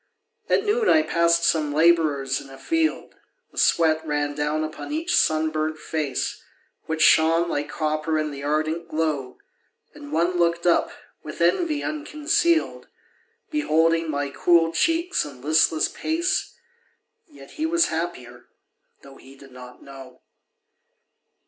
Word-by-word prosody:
At 400 - +2
noon 435 +2 +1
I 315 - +5
passed 170 - +2
some 155 -3 +1
labourers 150 -5 +2
in 140 - -14
a 135 - -12
field. 325 - -1 0.4
The - - -6
sweat 160 -1 +2
ran 145 -2 -2
down 150 +1 -1
upon 155 - -7
each 335 +3 -1
sunburnt 155 0 +1
face, 155 -3 -3 0.5
Which 160 0 0
shone 165 +2 +4
like 145 -3 -3
copper 155 0 -2
in 155 -1 -2
the 140 -1 -8
ardent 155 +3 -2
glow. 155 -5 -2 0.6
And 145 - -12
one 170 +3 0
looked 170 0 +1
up, 175 - +2 0.3
with 155 - -9
envy 295 - +1
unconcealed, 310 +2 -1 0.6
Beholding 165 - +1
my 145 -1 -2
cool 165 +1 +3
cheeks 330 - 0
and 135 -4 -11
listless 155 0 +3
pace, 340 +4 -2 0.7
Yet 300 - -15
he 315 +1 -3
was 340 +1 +2
happier, 125 -8 -5 0.6
though 135 -1 -14
he 135 +1 -16
did 135 0 -16
not 125 0 -13
know. 135 -2 -13
160 Hz, 135 wpm, -23 LUFS, 145-175 Hz, 0.7 s, I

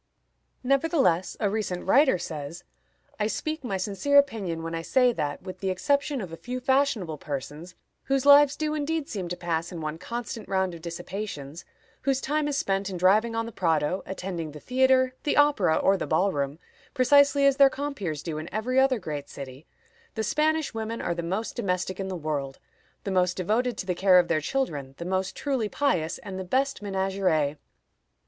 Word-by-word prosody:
Nevertheless, 270 - +2
a 210 - +1
recent 200 -3 -2
writer 265 +1 +5
says: 160 -1 -6 0.6
"I 210 - +1
speak 310 +6 -3
my 200 -6 -2
sincere 205 +9 +1
opinion 205 -12 +2
when 165 0 -4
I 165 - -2
say 250 +7 +3
that, 145 -7 -3
with 185 -1 -8
the 190 - -2
exception 280 +7 0
of 180 -4 -7
a - - -6
few 250 +5 -5
fashionable 250 - +1
persons, 150 +5 -6 0.3
whose 270 0 0
lives 285 0 +7
do 305 -1 -2
indeed 310 0 -2
seem 190 -5 -4
to 175 - -4
pass 170 0 -2
in 175 - -6
one 155 0 -4
constant 235 +2 -6
round 190 -2 0
of 165 - -9
dissipations, 170 -3 -6 0.4
whose 270 -1 +1
time 295 +2 -1
is 285 -1 -1
spent 195 -4 0
in 185 - -4
driving 210 +6 +3
on 230 0 -1
the 230 - -7
Prado, 165 -2 0
attending 175 -5 -5
the 150 - -9
theatre, 260 - +3
the 295 - 0
opera, 280 - +4
or 195 0 +3
the - - -4
ball 195 +2 +2
room, 140 -2 -2 0.4
precisely 280 +2 +5
as 275 -1 +4
their 275 -1 +7
compeers 260 - -4
do 155 -3 -4
in 155 - -8
every 245 +6 0
other 265 -1 +4
great 150 -7 -6
city, 135 +2 -9 0.5
the 220 - -1
Spanish 310 +5 +1
women 225 +1 -4
are 175 - -1
the 170 - -3
most 190 +7 -3
domestic 185 0 -2
in 195 - -3
the 190 - -4
world, 145 -4 -3 0.5
the 200 - -3
most 180 -1 +1
devoted 220 +6 0
to - - -4
the 185 - 0
care 185 +1 +5
of 175 -1 +4
their 155 -2 +2
children, 145 - -2
the 170 - -6
most 185 +1 -1
truly 260 -7 -1
pious, 175 - 0
and 190 -1 -7
the - - -3
best 265 +8 0
ménagères. 190 -7 0
195 Hz, 190 wpm, -26 LUFS, 170-260 Hz, 0.6 s, lives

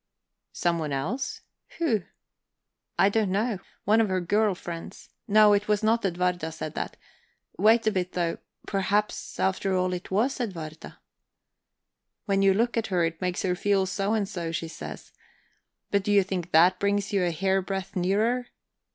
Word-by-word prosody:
"Someone 170 -4 0
else? 170 - -3 0.4
Who?" 255 - +1 1.0
"I 195 - +5
don't 210 0 +1
know. 210 +1 0 0.3
One 220 +3 +5
of 215 - +1
her 185 0 +1
girl 205 +3 +1
friends. 170 -2 -8 0.2
No, 210 0 +6
it 205 +1 +1
was 210 0 +1
not 225 +2 +2
Edwarda 180 -3 0
said 155 -1 -6
that. - - -4 0.6
Wait 220 +3 +5
a 220 - +3
bit 185 -2 -2
though; 170 -2 -1 0.3
perhaps, 200 +1 -1
after 190 0 +1
all, 185 0 0
it 180 0 -5
was 225 +9 +1
Edwarda..." 165 -8 -6 1.3
"When 195 -2 +1
you 195 0 +5
look 235 +3 +1
at 225 - 0
her, 180 -3 +1
it 165 +1 -4
makes 180 -1 -1
her 180 - +1
feel 195 +1 +1
so 195 +3 -1
and 205 -3 0
so, 170 -5 -4
she 165 0 -3
says. 160 - -9 0.8
But 200 - +3
do 205 - -1
you 200 -1 +5
think 185 -2 -4
that 180 +3 +5
brings 200 +1 0
you 195 -2 +2
a 175 - +2
hairbreadth 190 +2 -1
nearer? 215 +7 +1
195 Hz, 165 wpm, -27 LUFS, 180-210 Hz, 1.3 s, No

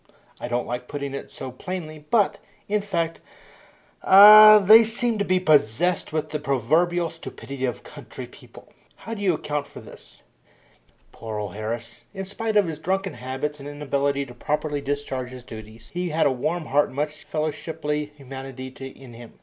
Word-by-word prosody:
I - - -5
don't 120 0 -1
like 125 +1 -5
putting 140 -1 -5
it 140 - -6
so 130 - -8
plainly, 155 +2 -7
but, 215 -4 +2 0.3
in 210 0 0
fact, 170 -5 -2 0.8
ah, 215 +2 +10
they 215 +3 +8
seem 225 0 0
to 200 - 0
be 185 -1 +2
possessed 155 +1 +2
with 155 -1 -3
the 150 - -2
proverbial 160 +6 +1
stupidity 135 -3 -6
of 125 -4 -4
country - - -10
people. - - -16 0.3
How 225 - -4
do 210 - -6
you 185 -4 +2
account 150 -1 -3
for - - -12
this?" - - -15 0.9
Poor 110 -2 -7
old 105 -3 -5
Harris! 115 +2 -6
In 195 0 -4
spite 215 +3 -2
of 205 - +5
his 160 -3 -5
drunken 190 +3 -2
habits 135 +4 -5
and 140 +1 -8
inability 140 -1 -1
to 125 - -12
properly 145 +3 -2
discharge 135 -3 -3
his 125 -1 -10
duties, 110 -1 -12
he 180 0 -2
had 160 +1 +1
a 140 - +4
warm 155 +6 -2
heart 145 +2 +2
and - - -13
much 150 +1 -4
fellowshiply 150 -1 -3
humanity 135 -1 -8 0.2
in 130 -2 -13
him. 115 0 -12
150 Hz, 175 wpm, -24 LUFS, 130-175 Hz, 0.9 s, ah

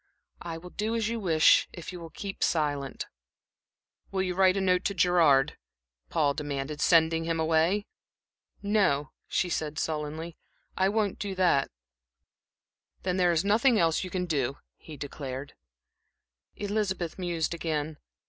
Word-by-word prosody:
"I 165 -1 -5
will 180 +2 -11
do 220 +2 -2
as 225 -1 0
you 230 0 -2
wish, 165 -6 +5
if 175 -1 -8
you 180 - -7
will 165 -1 -9
keep 195 +4 -5
silent." 145 -4 -1 1.0
"Will 190 -1 -1
you 180 -1 -1
write 190 +1 +4
a - - +2
note 185 -1 +2
to 200 - 0
Gerard," 165 -7 +4 0.5
Paul 150 -4 +2
demanded, 145 0 -4
"sending 165 -1 +4
him 165 0 -1
away?" 165 +6 +2 0.8
"No," 185 -10 +2 0.2
she - - 0
said, 155 -3 -3
sullenly. 155 +2 -3 0.4
"I 190 0 +2
won't 210 -2 0
do 195 -1 -3
that." 180 -7 +3 1.3
"Then 185 0 0
there 180 -1 +4
is 170 +2 +1
nothing 225 +4 +4
else 165 -2 +2
you 185 - -5
can 180 0 -2
do," 140 -5 -1 0.2
he 155 -2 -11
declared. 140 -1 -6 1.0
Elizabeth 200 -5 -2
mused 170 -3 -1
again. 155 -2 -3
170 Hz, 145 wpm, -28 LUFS, 155-190 Hz, 1.3 s, wish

